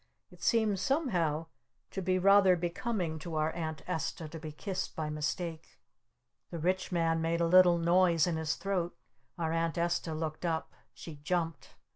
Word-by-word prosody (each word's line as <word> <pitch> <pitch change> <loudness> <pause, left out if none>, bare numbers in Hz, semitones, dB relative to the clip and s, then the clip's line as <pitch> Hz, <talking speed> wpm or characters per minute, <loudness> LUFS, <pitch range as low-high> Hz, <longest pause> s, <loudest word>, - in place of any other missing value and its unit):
It 180 -1 -17
seemed 215 -3 +2
somehow 180 - 0 0.5
to 195 - -3
be 185 0 +1
rather 195 0 +6
becoming 175 -1 -2
to 165 0 -6
our 155 +1 +1
Aunt 160 -2 -5
Esta 160 -2 -3
to 165 - -8
be 155 -1 -7
kissed 190 +5 -4
by 155 -1 -3
mistake. 160 +2 -4 0.7
The 170 - -5
Rich 185 +4 0
Man 165 -2 +1
made 165 +1 0
a 170 - +3
little 180 0 +6
noise 170 -1 +4
in 175 - -1
his 160 -1 -1
throat. 185 -3 -2 0.4
Our 165 -2 -1
Aunt 165 +1 0
Esta 170 -1 0
looked 155 0 -4
up. 165 -2 -2 0.2
She 160 -3 -9
jumped. 165 0 -3
170 Hz, 165 wpm, -31 LUFS, 160-185 Hz, 0.7 s, rather